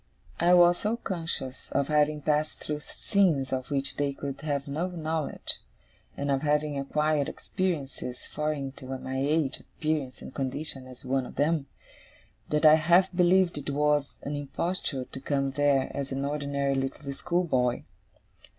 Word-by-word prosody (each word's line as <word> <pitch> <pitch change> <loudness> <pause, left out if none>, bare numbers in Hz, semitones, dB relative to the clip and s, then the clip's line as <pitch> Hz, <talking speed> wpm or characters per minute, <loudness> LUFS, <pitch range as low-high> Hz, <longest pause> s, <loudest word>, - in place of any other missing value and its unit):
I 175 +2 +6
was 175 0 +6
so 215 +3 0
conscious 165 - -4
of 140 0 +2
having 150 -1 +2
passed 150 0 +1
through 150 -1 -4
scenes 160 -10 +1
of 130 -1 -2
which 140 -1 -1
they 145 -1 0
could 140 0 -5
have 145 -2 -2
no 155 +6 -1
knowledge, 160 -3 -2 0.6
and 140 0 -1
of 135 -1 +2
having 150 0 +1
acquired 150 +1 +1
experiences 145 -9 -3
foreign 150 -3 -2
to 130 - -10
my 130 0 -4
age, 145 0 +1
appearance, 155 -5 -3
and - - -9
condition 135 0 -4
as 130 0 -13
one 130 0 0
of - - -11
them, 150 -1 +1 0.8
that 150 +1 +2
I 155 0 +9
half 175 +4 +4
believed 180 -2 +4
it 145 - -5
was 145 0 +1
an 145 - -3
imposture 145 -1 -2
to 135 - -8
come 135 0 0
there 140 -1 +2
as 140 -1 -3
an 135 +1 -1
ordinary 140 -1 0
little 135 +1 -2
schoolboy. 135 -8 +1
145 Hz, 155 wpm, -28 LUFS, 135-155 Hz, 0.8 s, I